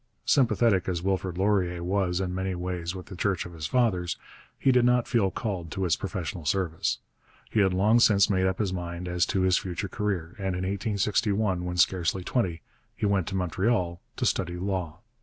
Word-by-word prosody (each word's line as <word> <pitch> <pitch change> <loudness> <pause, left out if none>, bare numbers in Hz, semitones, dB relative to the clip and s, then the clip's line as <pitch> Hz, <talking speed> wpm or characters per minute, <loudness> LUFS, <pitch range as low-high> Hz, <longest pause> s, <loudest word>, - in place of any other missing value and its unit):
Sympathetic 115 - +3
as 85 -2 -2
Wilfrid 95 -2 -1
Laurier 95 -3 +1
was 90 -1 0
in 90 -1 -2
many 95 0 -2
ways 90 0 -3
with 90 - -7
the 95 - -9
Church 95 -1 0
of 90 - -9
his 80 -2 -4
fathers, 95 -6 +1 0.4
he 135 - +3
did 125 -1 +4
not 125 0 +3
feel 110 -6 +2
called 95 -3 -4
to 95 +3 -2
its 85 - +3
professional 90 -3 -4
service. 85 +1 0 0.5
He 110 - +2
had 95 -2 +4
long 105 +6 +4
since 100 -4 +5
made 95 -3 +2
up 95 0 -1
his 100 -4 -1
mind 90 0 -5
as 90 0 +1
to 95 - 0
his 95 -1 +3
future 95 +2 -4
career, 95 -5 -2
and 95 -2 -1
in 90 - -3
1861, 100 -1 0
when 90 0 -3
scarcely 90 0 +2
twenty, 90 -7 -1 0.3
he - - -2
went 100 -5 +1
to 95 - -3
Montreal 90 0 0
to - - -2
study 85 - 0
law. 90 -2 -3
95 Hz, 195 wpm, -27 LUFS, 90-100 Hz, 0.5 s, since